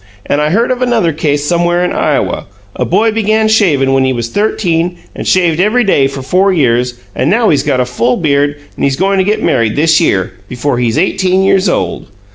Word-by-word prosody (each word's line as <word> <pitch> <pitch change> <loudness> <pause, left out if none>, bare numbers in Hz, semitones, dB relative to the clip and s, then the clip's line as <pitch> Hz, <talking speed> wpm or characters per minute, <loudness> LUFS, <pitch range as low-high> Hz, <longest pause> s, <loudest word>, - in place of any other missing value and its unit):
And 145 - 0
I 150 - +1
heard 230 +9 +1
of 250 0 -2
another 230 -10 +1
case 145 -1 -1
somewhere 175 +2 +1
in - - -2
Iowa - - -1 0.3
a - - -2
boy 215 +5 +1
began 220 0 +1
shaving 155 -12 +2
when 135 0 +2
he 130 0 +1
was 120 -1 -4
thirteen, 175 - -1 0.2
and - - -6
shaved 175 -3 +2
every 215 +6 +2
day 145 - +2
for 135 -1 -7
four 190 +8 +2
years, 125 -6 +1 0.2
and 130 - 0
now 225 +3 +2
he's 145 - +2
got 135 -3 -1
a 125 - +1
full 240 - -1
beard, 145 -3 0 0.2
and - - -5
he's 140 -1 +1
goin' 195 +4 0
to - - +3
get 210 +3 -1
married 115 -3 +1
this 160 +2 +3
year 95 - 0 0.2
before 125 0 -2
he's 120 -2 0
eighteen 185 +2 +1
years 195 0 +2
old. - - -2
170 Hz, 215 wpm, -12 LUFS, 140-195 Hz, 0.3 s, to